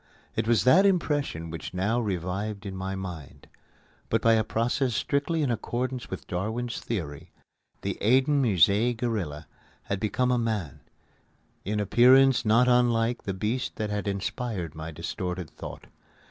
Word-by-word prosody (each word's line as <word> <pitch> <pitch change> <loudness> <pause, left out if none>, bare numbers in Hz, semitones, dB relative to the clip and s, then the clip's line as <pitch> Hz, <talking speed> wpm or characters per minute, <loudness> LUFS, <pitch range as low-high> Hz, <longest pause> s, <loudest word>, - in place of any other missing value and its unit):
It - - -1
was 115 -5 +3
that 165 - +6
impression 145 - 0
which 85 +2 -7
now 105 +6 +1
revived 100 +1 -3
in 95 -1 -5
my 95 +1 -4
mind. 90 -7 -8 0.6
But 115 - +2
by 115 - +5
a 110 -1 +3
process 120 +3 0
strictly 150 +6 0
in 130 - +1
accordance 125 +3 -3
with 95 - -6
Darwin's 110 +7 -3
theory, 80 -11 -5 0.5
the - - -3
Eden 135 +6 +4
Musée 110 +2 +3
gorilla 95 - -3 0.4
had 100 - -3
become 125 +5 0
a 125 - +2
man 105 - -2 0.8
in 105 +2 -2
appearance 125 +6 +5
not 115 +3 +4
unlike 120 -1 +2
the 95 - -2
beast 110 +7 -2
that 105 -1 -3
had 105 0 -3
inspired 100 - -3
my 80 0 -6
distorted 90 +1 -5
thought. - - -9
110 Hz, 145 wpm, -27 LUFS, 95-125 Hz, 0.8 s, that